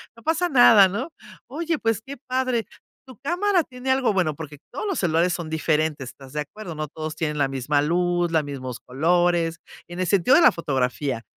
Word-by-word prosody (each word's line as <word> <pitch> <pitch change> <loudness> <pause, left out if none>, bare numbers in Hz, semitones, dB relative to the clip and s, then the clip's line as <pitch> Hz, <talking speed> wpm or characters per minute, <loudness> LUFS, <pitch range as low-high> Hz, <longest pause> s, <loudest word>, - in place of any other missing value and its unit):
no 230 - -17
pasa 325 +2 +1
nada, 235 - +7
¿no? 235 - -4 0.4
Oye, 330 +3 -2
pues 225 -2 0
qué 280 +1 -7
padre, 255 -2 0 0.4
tu 260 -5 -14
cámara 360 +3 +1
tiene 255 -1 -7
algo 260 -3 +2
bueno 180 -7 0
porque 150 -1 -9
todos 285 - -5
los 390 -4 -1
celulares 170 0 +2
son 170 -3 -4
diferentes, 155 -4 -1
¿estás 135 -1 -14
de 150 - -1
acuerdo? 175 +3 -8
No 155 -1 -4
todos 155 +1 -6
tienen 150 -2 -2
la 140 - +2
misma 135 +2 0
luz, 175 +2 +1
la 160 -2 +3
mismos 130 -4 -6
colores, 165 +4 +1 0.3
en 175 +1 -6
el 185 - 0
sentido 195 +7 +4
de 345 - +6
la - - +7
fotografía. 130 -4 -2
175 Hz, 195 wpm, -23 LUFS, 150-250 Hz, 0.4 s, nada